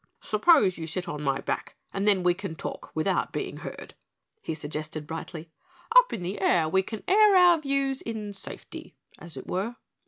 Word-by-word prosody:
"Suppose 215 - +4
you 160 - -5
sit 180 +3 -4
on 150 0 -4
my 135 -2 0
back - - -3 0.2
and 200 +1 -1
then 195 -3 +4
we 180 0 +4
can 170 -2 -6
talk - - -6
without 160 +5 0
being - - -4
heard," - - -8 0.5
he 160 - -4
suggested 155 0 -5
brightly. 160 +1 -7 0.4
"Up - - +8
in 185 - -4
the 190 +3 -4
air 165 -3 +3
we 190 +4 +3
can 215 +3 -7
air 415 +1 +6
our 355 -2 +7
views 275 -2 -1
in 215 -3 -5
safety, 195 - -9 0.2
as 170 -2 -10
it - - -7
were." 205 +6 -2
190 Hz, 185 wpm, -27 LUFS, 160-245 Hz, 0.5 s, Up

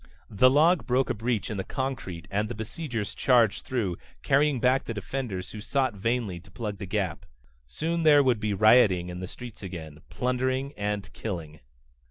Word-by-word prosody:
The 120 +5 +5
log 155 +5 +4
broke 130 +2 +2
a - - +1
breach 115 +1 -2
in 105 - -3
the 95 - -2
concrete 125 -12 -4
and 105 +2 0
the 120 - -5
besiegers 110 0 -4
charged 120 -5 +3
through, 105 -9 -2 0.2
carrying 140 -1 +3
back 130 +2 +2
the 115 - -4
defenders 105 -3 -4
who 105 - -7
sought 130 +1 0
vainly 105 -2 -1
to 95 +4 -18
plug 105 0 -5
the 100 - -5
gap. 95 -4 -2 0.4
Soon 165 - -2
there 150 -3 +6
would 125 -4 +2
be 105 0 -1
rioting 105 -5 +5
in 90 0 -6
the 90 - -5
streets 120 +3 -10
again, 80 -5 -8
plundering 130 +2 -1
and 100 -5 -3
killing. 85 -8 -6
110 Hz, 180 wpm, -27 LUFS, 95-130 Hz, 0.4 s, there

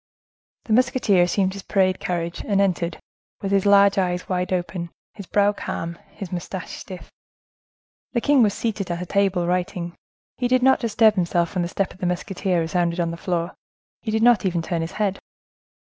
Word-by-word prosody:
The 220 - 0
musketeer 245 -6 +3
assumed 185 +2 +1
his 200 - -7
parade 190 -1 +1
carriage, 170 -1 -3
and 200 -2 +1
entered, 175 -4 0 0.4
with 195 - -3
his 195 0 +2
large 200 0 +6
eyes 180 -1 -1
wide 180 0 -1
open, 175 -1 -2 0.2
his 200 -4 -10
brow 205 0 +3
calm, 170 -4 -5
his 195 -2 -8
moustache 180 0 -5
stiff. 185 -1 -10 1.0
The 235 - +1
king 285 0 +4
was 210 -3 +3
seated 215 -5 -2
at 175 +1 -2
a - - -6
table 195 -2 +1
writing. 175 -1 -2 0.4
He 245 - 0
did 255 0 +2
not 265 0 +5
disturb 225 -2 +4
himself 175 -3 0
when 185 - 0
the 170 - -1
step 195 +2 -2
of - - -19
the 180 - -1
musketeer 180 0 -1
resounded 170 +1 0
on 170 -1 0
the - - -5
floor; 170 0 -2 0.5
he 225 - -5
did 220 +1 +1
not 240 -5 +5
even 175 -3 0
turn 170 -1 -2
his 165 - -4
head. 200 -2 -1
185 Hz, 190 wpm, -23 LUFS, 175-205 Hz, 1.0 s, large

